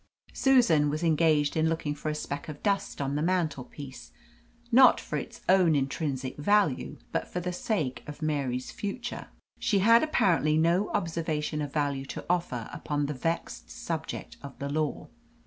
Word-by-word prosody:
Susan 230 - +4
was 155 +3 -2
engaged 155 -2 +3
in 160 0 +2
looking 160 -2 -1
for 150 +1 -4
a 150 - -2
speck 145 0 -5
of 150 -1 -8
dust 200 -1 0
on 140 -1 -1
the 145 - 0
mantelpiece, 150 -6 -3 0.6
not 255 +2 +7
for - - -5
its - - -5
own 180 -4 +5
intrinsic 135 -1 -2
value, 180 -2 +1
but - - -1
for 180 - -4
the 180 0 -3
sake 170 - -2
of 150 - -8
Mary's 140 -5 -2
future. 235 +4 -5 0.3
She 205 - +2
had 230 +4 +6
apparently 165 - +2
no 170 +5 +2
observation 160 -2 -2
of 145 -2 -4
value 140 -2 -1
to - - -7
offer 170 -10 -1
upon 145 -1 -2
the 150 - -2
vexed 140 - -3
subject - - -5
of 140 -2 -10
the 140 - -4
law. 150 0 -2
155 Hz, 165 wpm, -28 LUFS, 145-180 Hz, 0.6 s, not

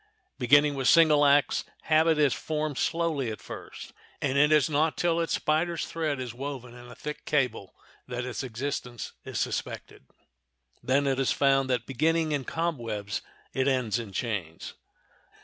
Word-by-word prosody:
Beginning 145 +4 +5
with 135 -2 -1
single 155 -3 +6
acts 140 0 +3 0.2
habit 160 0 +3
is 145 -4 +3
formed 155 -3 -3
slowly 165 -7 0
at 110 - -6
first, - - -9 0.3
and 135 -2 -1
it 150 +2 +4
is 150 -2 +5
not 155 +1 +1
till 170 -1 +1
its 165 - 0
spider's 165 +2 0
thread 155 -4 -2
is 125 -3 -5
woven 130 -1 -6
in 120 0 -12
a 120 - -11
thick 150 0 -6
cable 125 -9 -1 0.3
that 125 -1 -4
its 125 - -4
existence 125 -1 -5
is - - -4
suspected. 65 - -4 0.7
Then 140 +2 +2
it 135 -1 +1
is 135 - +2
found 135 -1 +2
that 125 -2 0
beginning 160 +4 +1
in 140 -3 -1
cobwebs 115 -12 -3 0.3
it 130 +1 +1
ends 125 -4 +1
in 110 -4 -7
chains. 95 -6 -4
140 Hz, 160 wpm, -28 LUFS, 125-155 Hz, 0.7 s, single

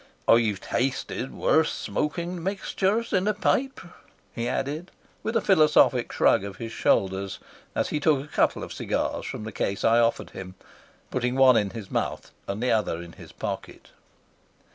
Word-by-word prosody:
"I've 110 -4 +4
tasted 130 0 -2
worse 160 0 +2
smoking 170 +3 -3
mixtures 200 +4 -1
in 190 +1 +2
a 210 - +2
pipe," 265 +5 0 0.5
he 115 0 -3
added, 150 +8 -3 0.3
with 225 - -3
a 230 - +3
philosophic 150 - +4
shrug - - +3
of 100 -1 -6
his 115 -1 -6
shoulders, 95 -2 +1 0.4
as - - 0
he 150 - -1
took 145 -2 +2
a - - -16
couple - - +1
of - - -7
cigars - - -2
from - - -5
the 110 - -6
case 100 -2 -2
I 115 +1 +5
offered 115 0 +1
him, 95 -1 -8 0.6
putting 125 0 -1
one 130 -2 +6
in 105 -3 +2
his 105 -2 -8
mouth - - -2 0.2
and 100 +4 -3
the 125 - +2
other 105 -6 +1
in 85 0 -9
his - - -13
pocket. - - -6
130 Hz, 165 wpm, -26 LUFS, 110-170 Hz, 0.6 s, one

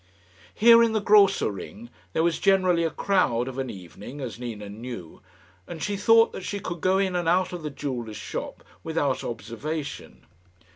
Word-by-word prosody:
Here, 230 +1 +7
in 230 -1 +3
the 220 - +2
Grosser 200 - +4
Ring, 205 - -9 0.2
there 160 - +1
was 170 -1 +1
generally 185 -3 +3
a 165 - +1
crowd 155 -12 +1
of 130 0 -5
an 130 -1 -3
evening, 100 - -10
as 120 -5 -6
Nina 110 -4 -6
knew, 110 -4 -8 0.5
and 165 -3 -7
she 205 - -1
thought 225 +3 +5
that - - -7
she 200 +2 -4
could 175 -4 -6
go 185 +1 +3
in 190 -2 0
and 175 -2 -1
out 180 +1 +2
of 175 - -5
the 155 - -4
jeweller's 125 -7 -5
shop - - -6 0.2
without 145 -5 -1
observation. 135 +7 -6
160 Hz, 180 wpm, -25 LUFS, 120-195 Hz, 0.5 s, Here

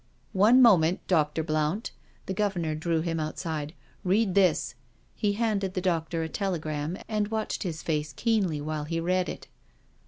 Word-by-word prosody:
" 130 - -37
One 255 +3 +7
moment. 180 -6 +4
Dr. 160 -2 +1
Blount." 155 +6 -1 0.3
The 190 - -3
Governor 190 -6 -1
drew 160 +1 0
him 165 -1 -2
outside. 155 0 -4
" - - -33
Read 195 +1 +2
this." 165 -8 +3 0.4
He 205 -1 0
handed 205 -4 -1
the - - +1
doctor 165 -2 -1
a - - -2
telegram^ 160 -3 -3
and 210 -2 0
watched 220 0 -2
his 165 -4 -4
face 150 -2 -1
keenly 195 - 0
while 150 0 -3
he 165 +2 -2
read 180 +1 0
it. - - -7
170 Hz, 165 wpm, -27 LUFS, 155-195 Hz, 0.4 s, One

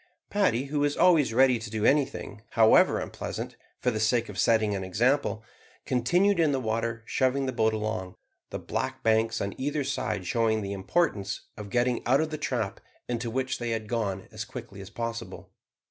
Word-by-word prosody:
Paddy, 160 - +2
who 145 +1 -2
was 145 0 +1
always 160 -9 +5
ready 130 0 +4
to 110 -1 -7
do 110 0 -2
anything, 135 -7 +1
however 110 -1 +5
unpleasant, - - -5 0.2
for 125 - 0
the 110 - -2
sake 115 +1 +1
of 100 -2 -6
setting 110 -3 +3
an 95 -1 -2
example, 115 +4 +1 0.4
continued 175 +10 +2
in 160 -3 +4
the 135 - +1
water 115 0 -2
shoving 135 +2 +1
the 130 - -1
boat 110 -1 +2
along; 110 -4 -3 0.3
the - - -4
black - - -4
banks 110 0 +2
on 100 -1 -2
either 145 +2 -1
side 140 +1 -2
showing 110 -3 +1
the 100 0 -3
importance 100 - -1
of 105 -1 -8
getting 120 +3 +1
out 130 +3 +4
of 160 0 -1
the 155 - -4
trap 115 -6 -2 0.3
into 120 -1 -2
which 130 +2 -2
they 120 -1 -3
had 110 -2 -2
gone 100 -5 -2
as 110 0 -5
quickly 120 -5 -9
as 95 - -9
possible. 115 0 -6
115 Hz, 185 wpm, -27 LUFS, 110-130 Hz, 0.4 s, always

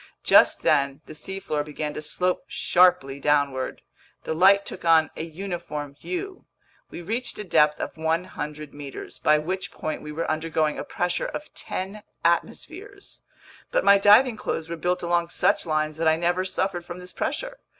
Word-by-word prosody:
Just - - +5
then 140 +1 +2
the - - -10
seafloor 180 -2 -3
began 150 0 -4
to 150 - -5
slope 180 +4 0
sharply 155 -7 +3
downward. 140 -2 0 0.4
The - - -2
light 195 +4 +5
took - - -7
on 165 -1 +4
a - - -4
uniform 170 -4 -5
hue. 370 - -6 0.4
We 175 - -8
reached 230 +8 -3
a 210 - -4
depth 150 -5 +3
of - - -4
100 160 -2 -3
meters, 145 -2 -9
by 150 - +4
which 180 +4 -3
point 155 - -4
we 150 - -7
were 160 +2 -3
undergoing 155 -1 -1
a - - -3
pressure 175 0 -2
of 300 - -7
ten 195 +3 -5 0.2
atmospheres. 360 - -2 0.5
But - - 0
my 200 0 +7
diving 215 +4 +6
clothes 165 -5 -3
were 170 - -3
built 180 +2 -1
along 170 0 +1
such - - +1
lines 155 -1 -1
that 165 0 0
I 160 - +5
never 175 +3 0
suffered 185 -1 -2
from 175 0 -8
this 180 0 -11
pressure. - - -3
170 Hz, 170 wpm, -25 LUFS, 150-190 Hz, 0.5 s, my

